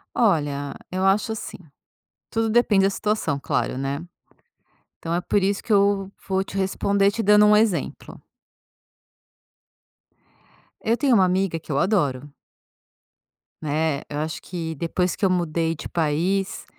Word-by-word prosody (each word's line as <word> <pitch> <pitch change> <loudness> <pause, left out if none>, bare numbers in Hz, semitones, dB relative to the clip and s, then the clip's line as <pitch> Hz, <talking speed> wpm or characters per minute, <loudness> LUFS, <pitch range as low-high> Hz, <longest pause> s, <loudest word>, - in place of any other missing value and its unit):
Olha, 145 -9 +1 0.2
eu 185 +1 -1
acho 205 +3 +2
assim, 220 - -7 0.7
tudo 225 -1 0
depende 215 -4 +3
da 195 - +4
situação, 200 -8 -1
claro, 130 - -1
né. 135 +3 -3 1.0
Então, 165 - -3
é 175 - +1
por 195 +2 0
isso 200 +1 0
que 235 - -3
eu 200 -1 +2 0.2
vou 190 0 +1
te 195 - -6
responder, 195 +1 +1
te 225 +3 -3
dando 210 +1 +6
um 210 0 +6
exemplo. 210 -4 -1 2.6
Eu 230 +1 +1
tenho 270 -1 +2
uma 195 -4 +5
amiga 185 -2 0
que 160 - -15
eu 140 - +1
adoro. 145 -7 0 1.3
Né. 150 -1 -1
Eu 145 - -5
acho 155 +1 -4
que 165 -3 -5
depois 170 +3 -1
que - - -3
eu - - +5
mudei 165 -2 0
de 155 - -8
país, 175 +5 -1
190 Hz, 145 wpm, -23 LUFS, 160-205 Hz, 2.6 s, dando